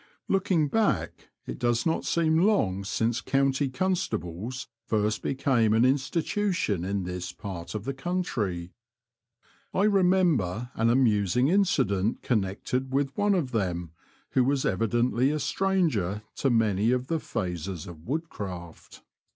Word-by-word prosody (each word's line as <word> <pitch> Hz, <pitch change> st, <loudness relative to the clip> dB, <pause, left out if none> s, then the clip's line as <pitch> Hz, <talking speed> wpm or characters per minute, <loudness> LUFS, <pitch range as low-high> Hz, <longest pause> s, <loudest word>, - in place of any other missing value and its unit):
Looking 185 Hz, -5 st, +2 dB
back 125 Hz, -, 0 dB, 0.2 s
it -, -, -6 dB
does 120 Hz, -1 st, +1 dB
not 160 Hz, -, 0 dB
seem 160 Hz, -1 st, +2 dB
long 110 Hz, -, +2 dB
since 115 Hz, +4 st, 0 dB
county 135 Hz, 0 st, +1 dB
constables 130 Hz, -, -2 dB, 0.2 s
first 105 Hz, -1 st, 0 dB
became 125 Hz, -5 st, +2 dB
an 115 Hz, -, +4 dB
insti 140 Hz, +5 st, +1 dB
tution 180 Hz, -, 0 dB
in 100 Hz, +1 st, -1 dB
this 90 Hz, 0 st, -4 dB
part 90 Hz, -1 st, -7 dB
of 105 Hz, -, -3 dB
the 135 Hz, -, -2 dB
country. 125 Hz, -, -2 dB, 1.0 s
I 190 Hz, -, +3 dB
remember 180 Hz, -, +2 dB
an 115 Hz, +1 st, +1 dB
amusing 120 Hz, 0 st, +3 dB
incident 130 Hz, -, +1 dB
connected 120 Hz, +4 st, -1 dB
with 135 Hz, 0 st, 0 dB
one 205 Hz, -1 st, +2 dB
of 150 Hz, -9 st, -1 dB
them 90 Hz, -7 st, -2 dB, 0.4 s
who 130 Hz, -, +3 dB
was 135 Hz, +1 st, +1 dB
evidently 120 Hz, +5 st, +1 dB
a 150 Hz, -, 0 dB
stranger 150 Hz, -, 0 dB
to 135 Hz, -, +1 dB
many 110 Hz, -3 st, +2 dB
of 125 Hz, 0 st, +1 dB
the 165 Hz, +4 st, -1 dB
phases 90 Hz, -, -4 dB
of 85 Hz, -1 st, -11 dB
woodcraft. 100 Hz, -, -6 dB
125 Hz, 135 wpm, -27 LUFS, 100-155 Hz, 1.0 s, an